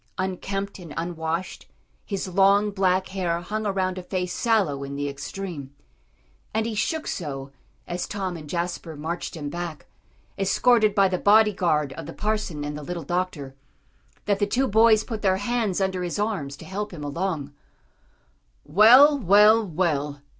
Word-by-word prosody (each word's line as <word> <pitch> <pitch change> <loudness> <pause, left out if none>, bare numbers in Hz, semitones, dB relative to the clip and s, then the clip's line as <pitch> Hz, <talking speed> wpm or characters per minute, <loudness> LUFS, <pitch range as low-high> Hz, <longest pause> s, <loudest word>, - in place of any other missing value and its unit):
Unkempt 195 +1 -3
and 165 -5 -10
unwashed, 165 +1 -4 0.4
his 195 -2 -4
long, 200 +3 +3
black 190 -1 +1
hair 180 -3 -1
hung 215 +4 -3
around 185 -2 -1
a - - -5
face 180 0 -3
sallow 195 - +1
in 140 0 -6
the 145 0 -2
extreme. 140 0 -7 0.8
And 220 0 +1
he 230 - -3
shook 310 +9 -1
so, 135 -5 -5 0.4
as 175 0 -3
Tom 190 -3 -3
and 155 -3 -9
Jasper 170 -1 -3
marched 165 +5 -5
him 145 -2 -5
back, 170 -3 -6 0.5
escorted 215 +2 +3
by 195 -2 +5
the 185 -1 -2
body 210 +1 +5
guard 150 -7 0
of 160 +1 -8
the 165 - -7
parson 210 -8 -2
and 145 0 -4
the 150 - -6
little 170 +2 -5
doctor, 175 -4 -3 0.7
that 200 -1 +1
the 205 - +1
two 260 +5 +1
boys 220 0 +5
put 225 -3 -5
their 190 -2 +2
hands 215 -2 -1
under 190 -1 -1
his 175 +1 -3
arms 195 -10 -2
to - - -12
help 205 +2 -4
him 160 -5 -8
along. 145 -1 -3 1.1
"Well 245 - +7
well 210 +2 +6
well!" 150 -5 -1
185 Hz, 160 wpm, -24 LUFS, 160-205 Hz, 1.1 s, Well